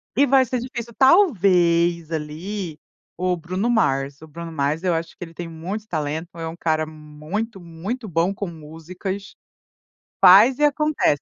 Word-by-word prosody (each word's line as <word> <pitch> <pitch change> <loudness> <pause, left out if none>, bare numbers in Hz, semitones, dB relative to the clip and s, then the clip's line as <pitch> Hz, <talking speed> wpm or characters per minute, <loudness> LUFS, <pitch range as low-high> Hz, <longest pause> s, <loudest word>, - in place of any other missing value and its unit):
e 285 - +5
vai 265 -1 +4
ser 250 +1 -2
difícil 235 -1 -6
talvez 175 - +4
ali, 160 +3 -5 0.4
o 180 +1 0
Bruno 185 +6 -2
Mars, 140 - +1
o 160 - -11
Bruno 165 +2 -8
Mars 150 +2 -1
eu 180 -2 +2
acho 165 0 -4
que - - -7
ele 165 -1 -10
tem 170 +1 -6
muito 180 +7 -6
talento, 155 -1 -3
é 165 -1 -4
um 160 - -6
cara 155 -2 0
muito, 155 +8 -6
muito 185 +8 -6
bom 170 +1 +1
com 200 0 -4
músicas, 175 +5 -7 0.9
faz 205 +8 +8
e - - +1
acontece. 295 - +2
175 Hz, 160 wpm, -22 LUFS, 160-210 Hz, 0.9 s, faz